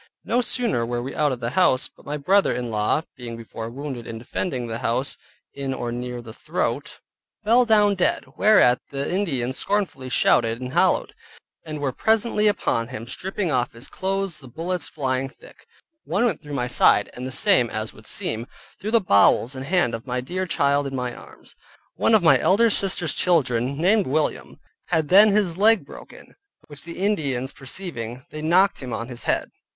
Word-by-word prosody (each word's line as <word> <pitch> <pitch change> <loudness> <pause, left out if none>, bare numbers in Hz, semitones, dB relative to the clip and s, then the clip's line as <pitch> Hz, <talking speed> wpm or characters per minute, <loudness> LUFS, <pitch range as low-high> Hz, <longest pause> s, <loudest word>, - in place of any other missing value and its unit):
No 245 - +1
sooner 235 - 0
were 120 +1 -3
we 135 - -6
out 150 -2 +1
of 125 -1 -5
the 115 - -2
house, 140 -5 +3
but - - -21
my 150 +1 -3
brother 195 +8 +3
in 120 -2 -3
law 105 +8 0
(being 120 -2 -7
before 115 0 -7
wounded, 130 -2 -7
in 115 - -6
defending 125 +2 -4
the 115 0 -5
house, 125 +4 -1 0.4
in 135 -1 -4
or 120 -2 -4
near 125 0 -5
the 110 -2 -10
throat) - - -3 0.4
fell 235 +4 +4
down 210 -3 +4
dead, 185 -2 0
whereat 195 -13 +4
the 140 0 -3
Indians 135 -10 -1
scornfully 195 -11 -2
shouted, 115 -2 +2
and 130 0 -6
hallowed, - - +2 0.5
and 155 -1 -6
were 140 -2 -1
presently 220 - +1
upon 115 - 0
him, 115 -2 -7
stripping 185 - -3
off 125 -3 0
his 115 +3 -10
clothes, 195 -2 -2
the 135 - -13
bullets 170 +6 -3
flying 135 -2 -2
thick, - - -19 0.4
one 195 +9 0
went 200 -11 -1
through 145 -2 -7
my 125 -3 -1
side, 125 - +4
and 125 +1 -6
the - - -6
same 130 - +3
(as 110 0 -4
would 110 - -14
seem) 115 +2 -2 0.3
through 210 - -4
the 230 +1 +4
bowels 120 - +3
and 130 0 -6
hand 175 -9 +2
of 115 +4 -6
my 125 0 -1
dear 185 +9 -3
child 140 -3 +1
in 135 - -5
my 125 -1 -3
arms. - - -13 0.4
One 225 - +3
of 210 - +3
my 165 - +6
elder 230 +4 +3
sisters' 180 -6 +4
children, 135 -6 +2
named 195 +6 +2
William, 150 +3 -2 0.3
had 160 -2 0
then 205 +4 +7
his 200 -5 +1
leg 215 -6 +4
broken, - - -13 0.3
which 145 0 -12
the 170 - -8
Indians 145 -10 -1
perceiving, 130 -6 -5
they 155 - -7
knocked 180 +5 +3
him 125 -3 -6
on 115 - -4
[his] 120 -2 -7
head. - - 0
140 Hz, 190 wpm, -23 LUFS, 125-185 Hz, 0.5 s, then